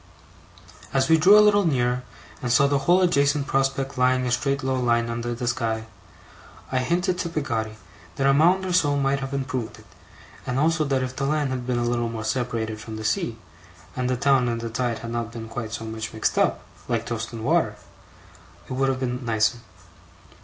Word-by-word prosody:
As 135 Hz, -1 st, +2 dB
we 160 Hz, 0 st, +5 dB
drew 195 Hz, +6 st, +7 dB
a 210 Hz, -, +7 dB
little 205 Hz, -1 st, +4 dB
nearer, 125 Hz, -6 st, +1 dB, 0.4 s
and 125 Hz, -, -2 dB
saw 140 Hz, +3 st, +5 dB
the 140 Hz, 0 st, +2 dB
whole 185 Hz, +1 st, +6 dB
adjacent 140 Hz, -5 st, +2 dB
prospect 135 Hz, -1 st, -1 dB
lying 130 Hz, 0 st, +3 dB
a 125 Hz, -, -1 dB
straight 135 Hz, +3 st, 0 dB
low 130 Hz, 0 st, 0 dB
line 115 Hz, -1 st, +1 dB
under 120 Hz, +1 st, -3 dB
the 120 Hz, +1 st, -4 dB
sky, 115 Hz, -2 st, -1 dB, 0.9 s
I 130 Hz, -, +1 dB
hinted 175 Hz, +7 st, 0 dB
to 170 Hz, -, -2 dB
Peggotty 115 Hz, -9 st, -3 dB, 0.4 s
that 135 Hz, -, -1 dB
a 135 Hz, -, +5 dB
mound 175 Hz, +6 st, +4 dB
or 185 Hz, -, -2 dB
so 145 Hz, -5 st, +3 dB
might 140 Hz, 0 st, +1 dB
have 135 Hz, 0 st, -5 dB
improved 130 Hz, -4 st, -3 dB
it; -, -, -17 dB, 0.6 s
and 125 Hz, -, -1 dB
also 160 Hz, +2 st, +2 dB
that 135 Hz, -2 st, 0 dB
if 130 Hz, 0 st, -5 dB
the 135 Hz, -, -2 dB
land 150 Hz, -2 st, 0 dB
had 125 Hz, -1 st, -4 dB
been 125 Hz, -1 st, 0 dB
a 120 Hz, -, 0 dB
little 120 Hz, -1 st, 0 dB
more 115 Hz, -1 st, -5 dB
separated 110 Hz, -2 st, -2 dB
from 110 Hz, 0 st, -7 dB
the 110 Hz, 0 st, -6 dB
sea, 110 Hz, +1 st, -1 dB, 0.6 s
and 125 Hz, 0 st, -1 dB
the 125 Hz, -, 0 dB
town 135 Hz, -2 st, +3 dB
and 115 Hz, 0 st, -2 dB
the 115 Hz, 0 st, -5 dB
tide 120 Hz, -1 st, -1 dB
had 115 Hz, -, -5 dB
not 115 Hz, -1 st, -3 dB
been 115 Hz, -1 st, -7 dB
quite 110 Hz, -1 st, -5 dB
so 115 Hz, -, -5 dB
much 110 Hz, 0 st, -5 dB
mixed 110 Hz, -, 0 dB
up, -, -, +1 dB, 0.2 s
like 115 Hz, -1 st, -1 dB
toast 115 Hz, -1 st, -4 dB
and 115 Hz, -2 st, -7 dB
water, -, -, +2 dB, 0.9 s
it -, -, -5 dB
would 135 Hz, +1 st, +1 dB
have 130 Hz, -1 st, -1 dB
been 125 Hz, 0 st, -3 dB
nicer. 110 Hz, 0 st, +1 dB
125 Hz, 210 wpm, -24 LUFS, 115-140 Hz, 0.9 s, drew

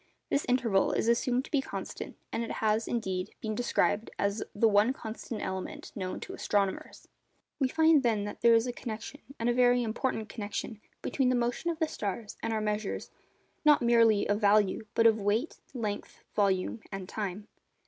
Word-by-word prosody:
This 280 Hz, -, +1 dB
interval 230 Hz, -6 st, +2 dB
is -, -, 0 dB
assumed 245 Hz, +2 st, +2 dB
to -, -, -14 dB
be 285 Hz, -, +3 dB
constant, -, -, -6 dB, 0.2 s
and 230 Hz, -, 0 dB
it 230 Hz, -, -4 dB
has, 220 Hz, +1 st, +1 dB
indeed, 190 Hz, -6 st, -2 dB
been 215 Hz, -1 st, -3 dB
described 215 Hz, -1 st, +1 dB
as 200 Hz, +2 st, 0 dB
the 225 Hz, +2 st, +4 dB
'one 210 Hz, +4 st, +4 dB
constant 220 Hz, -2 st, -6 dB
element' 190 Hz, 0 st, -5 dB
known 185 Hz, -2 st, -4 dB
to 375 Hz, -, -7 dB
astronomers. 200 Hz, -, -1 dB, 0.5 s
We 270 Hz, -, +3 dB
find, 320 Hz, +1 st, +4 dB
then, 225 Hz, -5 st, +1 dB
that 205 Hz, 0 st, -6 dB
there 235 Hz, -1 st, +7 dB
is 225 Hz, +1 st, +3 dB
a 245 Hz, -, -3 dB
connection, 230 Hz, +4 st, -7 dB, 0.2 s
and 230 Hz, -, -1 dB
a 240 Hz, -, +3 dB
very 245 Hz, 0 st, +4 dB
important 225 Hz, -1 st, -2 dB
connection, 210 Hz, 0 st, -5 dB, 0.2 s
between 265 Hz, -2 st, +1 dB
the 255 Hz, -, +3 dB
motion 240 Hz, +7 st, 0 dB
of 335 Hz, -, -2 dB
the 320 Hz, -1 st, +1 dB
stars 210 Hz, -3 st, -4 dB
and 225 Hz, -, -2 dB
our 220 Hz, -1 st, 0 dB
measures, 210 Hz, -1 st, -2 dB, 0.5 s
not 300 Hz, -4 st, +5 dB
merely 230 Hz, -3 st, +4 dB
of 205 Hz, +2 st, +1 dB
value, 210 Hz, +1 st, +3 dB
but 230 Hz, -, +4 dB
of 220 Hz, -1 st, +5 dB
weight, 215 Hz, +9 st, 0 dB, 0.2 s
length, 210 Hz, -4 st, -4 dB
volume, 200 Hz, +2 st, +1 dB
and 195 Hz, -2 st, -5 dB
time. 205 Hz, 0 st, -4 dB
225 Hz, 180 wpm, -30 LUFS, 205-245 Hz, 0.5 s, there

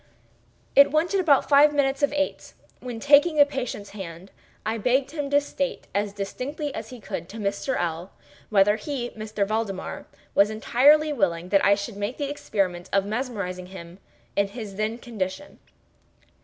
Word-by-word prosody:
It 280 Hz, +1 st, +8 dB
wanted 335 Hz, +6 st, +1 dB
about 300 Hz, -7 st, +4 dB
five 290 Hz, +1 st, +6 dB
minutes 275 Hz, -1 st, +1 dB
of 285 Hz, -, +3 dB
eight 290 Hz, 0 st, -2 dB, 0.3 s
when, 245 Hz, -3 st, -6 dB
taking 290 Hz, +5 st, +5 dB
the 290 Hz, -1 st, +7 dB
patient's 250 Hz, -7 st, -5 dB
hand, 185 Hz, -2 st, -9 dB, 0.3 s
I 220 Hz, +1 st, -1 dB
begged 260 Hz, +5 st, +1 dB
him 295 Hz, -3 st, -3 dB
to 285 Hz, 0 st, +5 dB
state, 280 Hz, -1 st, -4 dB
as 205 Hz, 0 st, 0 dB
distinctly 255 Hz, +9 st, -5 dB
as -, -, -6 dB
he 250 Hz, -, -10 dB
could, 170 Hz, -4 st, -6 dB
to 225 Hz, -, -9 dB
Mr. 205 Hz, +5 st, -2 dB
L—l, 170 Hz, +1 st, -3 dB, 0.4 s
whether 205 Hz, 0 st, +4 dB
he 260 Hz, -4 st, -5 dB
(M. 215 Hz, -, -6 dB, 0.2 s
Valdemar) 210 Hz, -2 st, -3 dB, 0.3 s
was 200 Hz, +1 st, +5 dB
entirely 290 Hz, +8 st, +4 dB
willing 180 Hz, -7 st, 0 dB
that 195 Hz, 0 st, +3 dB
I 200 Hz, -, +5 dB
should 200 Hz, +1 st, -6 dB
make 205 Hz, +5 st, -3 dB
the 285 Hz, -1 st, -2 dB
experiment 190 Hz, -10 st, -2 dB
of 195 Hz, 0 st, +2 dB
mesmerizing 200 Hz, -6 st, -4 dB
him 180 Hz, -1 st, -11 dB, 0.4 s
in 200 Hz, 0 st, +2 dB
his 205 Hz, -1 st, -8 dB
then 215 Hz, +3 st, -2 dB
condition. 225 Hz, +1 st, -5 dB
220 Hz, 165 wpm, -25 LUFS, 195-280 Hz, 0.4 s, It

